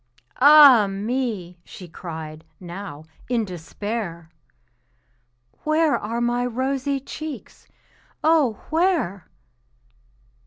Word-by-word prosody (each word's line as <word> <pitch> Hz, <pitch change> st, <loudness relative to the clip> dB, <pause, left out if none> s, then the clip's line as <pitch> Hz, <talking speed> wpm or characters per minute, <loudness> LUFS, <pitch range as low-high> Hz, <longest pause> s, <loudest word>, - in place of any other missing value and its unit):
"Ah, 280 Hz, -7 st, +8 dB
me!" 200 Hz, -3 st, -3 dB
she 180 Hz, -, -11 dB
cried, 160 Hz, -2 st, -8 dB, 0.2 s
now, 175 Hz, -4 st, -8 dB, 0.3 s
in 235 Hz, -3 st, +1 dB
despair, 175 Hz, -1 st, -6 dB, 1.3 s
"Where 310 Hz, 0 st, +2 dB
are 230 Hz, +3 st, -3 dB
my 240 Hz, +1 st, 0 dB
rosy 265 Hz, +3 st, -1 dB
cheeks 285 Hz, -1 st, -9 dB, 0.6 s
oh, 310 Hz, -7 st, +3 dB, 0.2 s
where?" 320 Hz, -, 0 dB
230 Hz, 80 wpm, -23 LUFS, 180-275 Hz, 1.3 s, Ah